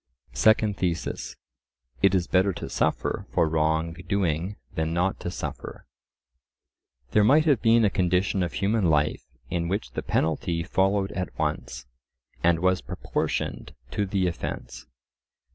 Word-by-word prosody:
Second 105 - +3
Thesis:— 85 -2 -2 0.7
It 95 -1 +4
is 90 -2 +2
better 95 +1 +2
to - - -6
suffer - - -1
for 80 - +2
wrong 80 +1 +1 0.2
doing 95 -1 0 0.2
than 80 +1 -1
not 90 +2 0
to - - -4
suffer. 90 - -6 1.3
There 105 - +4
might 150 +8 +5
have 140 -8 +3
been 115 -1 +5
a 100 - +2
condition 90 +1 +1
of 90 - -2
human 100 -2 +1
life 75 -1 +2 0.3
in 85 -1 -1
which 100 +5 -2
the - - -3
penalty 85 +1 0
followed 95 +3 +1
at 90 -1 -5
once, 65 -4 -3 0.6
and 85 -1 +3
was 95 0 +2
proportioned - - -3 0.2
to 105 -2 -1
the 95 -1 0
offence. 80 -7 -5
90 Hz, 140 wpm, -26 LUFS, 80-100 Hz, 1.3 s, might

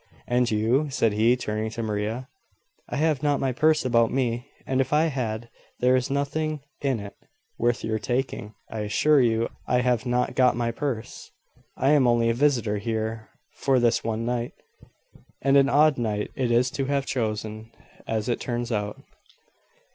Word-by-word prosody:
"And 125 0 +1
you?" 115 +8 +1
said 115 -5 +1
he, 115 +4 +3
turning 110 -2 -3
to 115 +1 -5
Maria. 110 +4 -3 0.6
"I - - -3
have 155 -2 +1
not 145 -2 +1
my 135 - 0
purse 155 +4 +2
about 115 -2 +3
me; 125 -1 -1 0.2
and 130 0 +1
if 135 - -3
I 150 +1 +4
had 115 -3 -3 0.3
there 125 +1 +4
is 130 -1 0
nothing 150 +2 -1 0.2
in 135 -5 0
it 100 0 -8 0.5
worth 120 0 +1
your 110 0 -1
taking. 120 -2 -3
I 110 - -6
assure 135 +8 +3
you 115 -1 +2 0.2
I 125 0 +2
have 125 -1 0
not 125 0 0
got 130 -1 +4
my 120 0 -1
purse. 115 -2 -5 0.5
I 135 +2 +3
am 140 -4 +5
only 115 -1 +3
a - - +1
visitor 120 -6 +1
here 110 0 -3 0.2
for 135 -2 +1
this 120 -1 +2
one 115 0 -2
night 120 0 -2 0.9
and 135 +1 +2
an 140 0 +5
odd 150 -2 +4
night 105 -3 -2
it 130 -3 0
is 120 +1 +3
to 135 - -2
have 140 0 0
chosen, 110 -2 -3 0.4
as 110 -1 -1
it 120 - 0
turns 120 0 -3
out." 105 -2 -2
120 Hz, 175 wpm, -25 LUFS, 110-135 Hz, 0.9 s, am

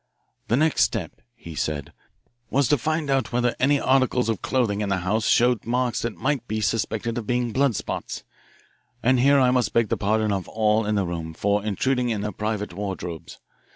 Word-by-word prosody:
"The 115 - +2
next 155 +1 +2
step," - - -1
he 85 -8 -10
said, 75 -2 -3 0.6
"was 140 0 +2
to 145 - +4
find 155 +2 -1
out 135 -1 +1
whether 120 0 +1
any 140 +2 +3
articles 130 -3 +2
of 110 - -1
clothing 115 -6 0
in 105 - -1
the 95 -2 0
house 110 +4 +1
showed 120 -2 +3
marks 125 +1 0
that 115 -2 -3
might 135 -3 -1
be 110 0 -2
suspected 115 +2 -1
of 110 - -8
being 120 -1 0
blood 135 -1 +2
spots. - - -4 0.8
And 130 +1 +4
here 140 +2 +5
I 125 -1 +4
must 125 -5 +1
beg 115 -3 +2
the - - 0
pardon 110 +1 +1
of 95 -2 -2
all 110 0 +1
in 105 - +1
the 100 -2 +1
room 80 -2 -5
for 100 +2 +1
intruding 125 +4 0
in 110 -3 -1
their 105 +1 -2
private 105 -1 -3
wardrobes. 90 -4 -6
115 Hz, 195 wpm, -24 LUFS, 105-125 Hz, 0.8 s, here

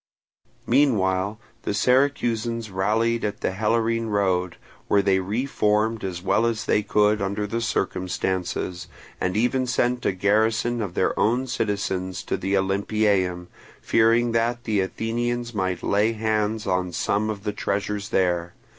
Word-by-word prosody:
Meanwhile 105 -7 +2 0.2
the 100 - -2
Syracusans 120 -3 +1
rallied 110 +5 +1
at 105 -1 -3
the - - 0
Helorine 115 +3 0
road, 95 -4 0 0.3
where 100 -1 +3
they 95 -1 +3
re 105 +8 -2
formed 110 -3 +1
as 90 -2 -4
well 115 +4 +2
as 110 -2 -2
they 105 - +2
could 105 +1 +2
under 100 +2 -1
the 115 +3 -3
circumstances, 95 -3 -2 0.3
and 90 +2 -1
even 125 +3 +1
sent 125 +1 0
a - - +3
garrison 110 +5 +1
of 100 -5 -4
their - - +1
own 120 +6 +2
citizens 100 -6 -2
to - - -2
the 95 +1 -1
Olympieum, 95 -2 +1 0.3
fearing 115 +1 +3
that 120 +1 0
the 110 -4 0
Athenians 120 +4 -2
might 95 -4 -2
lay 105 +3 +2
hands 110 -1 -1
on 90 -1 0
some 100 +5 0
of 100 -2 -5
the 105 - -2
treasures 100 0 -2
there. 90 -2 0
105 Hz, 145 wpm, -24 LUFS, 95-115 Hz, 0.3 s, where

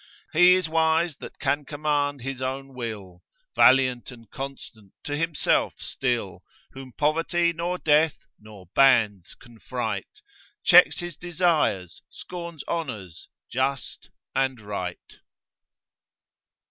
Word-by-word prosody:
He 180 +3 +7
is 185 -3 0
wise 160 0 +1
that - - -10
can 145 +1 0
command 145 -1 -1
his 135 -1 -5
own 135 +1 -4
will, 105 -8 -7 0.3
Valiant 130 -2 +4
and 115 -3 -13
constant 130 -7 -9
to 145 -2 -3
himself 165 0 +1
still, 115 -9 -3 0.3
Whom 135 -1 -10
poverty 165 +4 +1
nor 170 +2 -2
death, 155 -1 +2
nor 105 -3 -14
bands 110 -9 +3
can 120 -3 -18
fright, 110 -7 -5 0.4
Checks - - +7
his 175 -2 -6
desires, 165 - 0
scorns 170 -4 -8
honours, 110 - -5 0.2
just 130 +2 -3 0.2
and 130 -2 0
right. 100 -4 -6
135 Hz, 110 wpm, -25 LUFS, 115-160 Hz, 0.4 s, He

